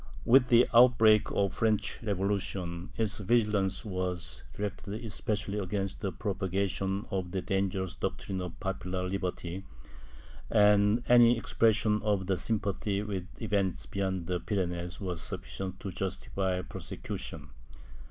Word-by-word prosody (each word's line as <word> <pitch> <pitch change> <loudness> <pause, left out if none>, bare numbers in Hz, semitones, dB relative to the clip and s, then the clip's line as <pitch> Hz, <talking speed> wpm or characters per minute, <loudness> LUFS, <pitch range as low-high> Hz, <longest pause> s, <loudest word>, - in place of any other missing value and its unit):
With 125 +1 +6
the 120 0 +6
outbreak 115 -3 +6
of 100 -2 +1
the - - -12
French 110 -1 +1
Revolution, 95 -3 -2
its 110 -2 0
vigilance 105 -3 +1
was 90 -3 -2
directed 100 0 -4
especially 105 -1 -2
against 95 0 -2
the 100 - -1
prop 95 +2 -4
agation 95 +2 -1
of 95 -2 -2
the 95 0 -3
dangerous 95 -1 -1
doctrines 95 -2 -3
of 85 -2 -7
popular 90 -1 -3
liberty, 90 -1 -3 0.9
and 105 +2 +4
any 120 -1 +7
expression 110 -2 +2
of 105 -3 0
sympathy 100 -1 -1
with 100 -4 -4
events 100 -5 -1
beyond 95 -3 -2
the 90 0 -1
Pyrenees 90 -1 -2
was 90 -4 -3
sufficient 95 -1 -5
to 100 - -4
justify 95 0 -2
prosecution. 75 -3 -6
100 Hz, 125 wpm, -30 LUFS, 95-105 Hz, 0.9 s, any